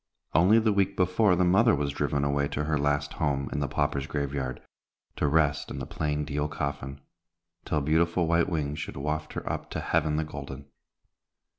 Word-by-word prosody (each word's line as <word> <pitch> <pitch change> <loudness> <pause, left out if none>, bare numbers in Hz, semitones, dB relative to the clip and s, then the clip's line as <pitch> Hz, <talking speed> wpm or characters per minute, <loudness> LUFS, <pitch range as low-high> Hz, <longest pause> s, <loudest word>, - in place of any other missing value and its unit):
Only 95 +7 +5
the 110 -2 +3
week 100 0 +1
before, 90 +2 +3
the 90 - +2
mother 100 +6 +5
was 70 -1 -1
driven 70 0 -1
away 70 0 +1
to 75 - -2
her 75 +1 0
last 70 0 0
home 70 -3 -1
in - - -1
the 70 - 0
paupers' 70 -1 -1
grave 70 -2 -2
yard, 65 -3 -3 0.6
to - - +1
rest 75 0 +2
in - - -6
the 70 - -4
plain 75 -1 -2
deal 75 0 -1
coffin, 70 -2 -4 0.6
till 75 - 0
beautiful 85 +4 +2
white 85 +1 +2
wings 75 -3 -2
should 75 - -6
waft 75 +2 -3
her - - -6
up - - -3
to - - -4
Heaven 80 -1 +1
the 80 - +1
Golden. 70 -2 -8
75 Hz, 190 wpm, -28 LUFS, 70-80 Hz, 0.6 s, Only